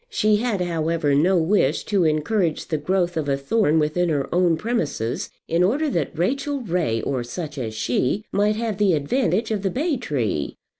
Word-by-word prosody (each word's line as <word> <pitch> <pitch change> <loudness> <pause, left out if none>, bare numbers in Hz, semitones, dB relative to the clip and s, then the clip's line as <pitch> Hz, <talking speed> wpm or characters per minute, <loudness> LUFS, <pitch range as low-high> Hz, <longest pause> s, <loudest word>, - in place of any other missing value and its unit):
She 215 - +2
had, 220 -4 -1
however, 165 -3 0
no 175 +7 +3
wish 175 +5 +2
to 195 -5 +1
encourage 160 +3 0
the 155 - -1
growth 175 +3 0
of 150 -3 -1
a 135 - +1
thorn 160 +3 +1
within 160 +3 +1
her 145 -3 -1
own 175 -2 +3
premises, 160 - -2 0.2
in 165 +2 +1
order 275 +11 +2
that 160 - -2
Rachel 275 - -1
Ray, 170 - -1
or 130 -3 -1
such 150 +5 -6
as 110 -3 -4
she, 125 - 0
might 210 +1 +2
have 220 -2 -3
the 200 -3 +4
advantage 220 - 0
of 210 -3 -1
the 195 - 0
bay 290 - -1
tree. 120 - -2
175 Hz, 185 wpm, -23 LUFS, 150-215 Hz, 0.2 s, the